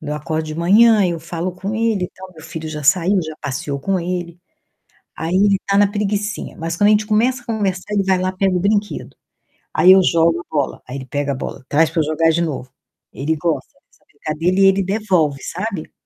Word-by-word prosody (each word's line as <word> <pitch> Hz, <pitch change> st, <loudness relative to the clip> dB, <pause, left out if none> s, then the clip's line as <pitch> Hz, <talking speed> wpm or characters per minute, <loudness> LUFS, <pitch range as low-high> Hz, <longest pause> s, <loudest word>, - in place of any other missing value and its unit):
quando 150 Hz, -, -8 dB
eu 150 Hz, -, -1 dB
acordo 155 Hz, +1 st, -3 dB
de 155 Hz, -, -5 dB
manhã, 210 Hz, +7 st, +5 dB
aí 185 Hz, -3 st, +2 dB
eu 170 Hz, -1 st, -4 dB
falo 170 Hz, +2 st, -4 dB
com 195 Hz, +4 st, -5 dB
ele 220 Hz, -4 st, 0 dB
e -, -, -6 dB
tal, 185 Hz, 0 st, -11 dB
meu 160 Hz, -, -13 dB
filho 160 Hz, 0 st, -6 dB
já 150 Hz, -1 st, -6 dB
saiu, 180 Hz, +6 st, +3 dB
já 155 Hz, 0 st, -6 dB
passeou 140 Hz, 0 st, -3 dB
com 195 Hz, +4 st, 0 dB
ele, 175 Hz, -1 st, -4 dB, 0.8 s
aí 165 Hz, +3 st, -2 dB
ele 200 Hz, 0 st, +3 dB
tá 200 Hz, 0 st, +2 dB
na 205 Hz, 0 st, +5 dB
preguicinha, 205 Hz, 0 st, -2 dB
mas 165 Hz, +1 st, -4 dB
quando 205 Hz, -, +4 dB
a -, -, +6 dB
gente 210 Hz, 0 st, +2 dB
começa 240 Hz, +4 st, +1 dB
a -, -, -26 dB
conversar, 205 Hz, -3 st, -2 dB
ele 200 Hz, -1 st, +2 dB
vai 190 Hz, -1 st, +2 dB
lá 185 Hz, 0 st, -1 dB
pega 190 Hz, 0 st, 0 dB
o -, -, +1 dB
brinquedo. 205 Hz, +2 st, -1 dB, 0.6 s
Aí 185 Hz, +1 st, +7 dB
eu 190 Hz, -, +6 dB
jogo 170 Hz, -1 st, +2 dB
a -, -, -11 dB
bola, 145 Hz, -3 st, -1 dB
aí 125 Hz, -, -7 dB
ele 130 Hz, -1 st, -7 dB
pega 145 Hz, +2 st, -2 dB
a -, -, -2 dB
bola, 130 Hz, 0 st, -7 dB
traz 155 Hz, +2 st, +3 dB
para 165 Hz, -, 0 dB
eu -, -, +2 dB
jogar 165 Hz, +1 st, +2 dB
de 165 Hz, +1 st, +1 dB
novo. 135 Hz, -5 st, -4 dB, 0.4 s
Ele 150 Hz, +4 st, -1 dB
gosta 165 Hz, +1 st, -2 dB, 0.2 s
dessa -, -, -30 dB
brincadeira 170 Hz, +5 st, -2 dB
e 195 Hz, -, +6 dB
ele 195 Hz, +1 st, +4 dB
devolve, 180 Hz, -8 st, 0 dB
sabe. 185 Hz, -2 st, -5 dB
180 Hz, 230 wpm, -19 LUFS, 160-200 Hz, 0.8 s, Aí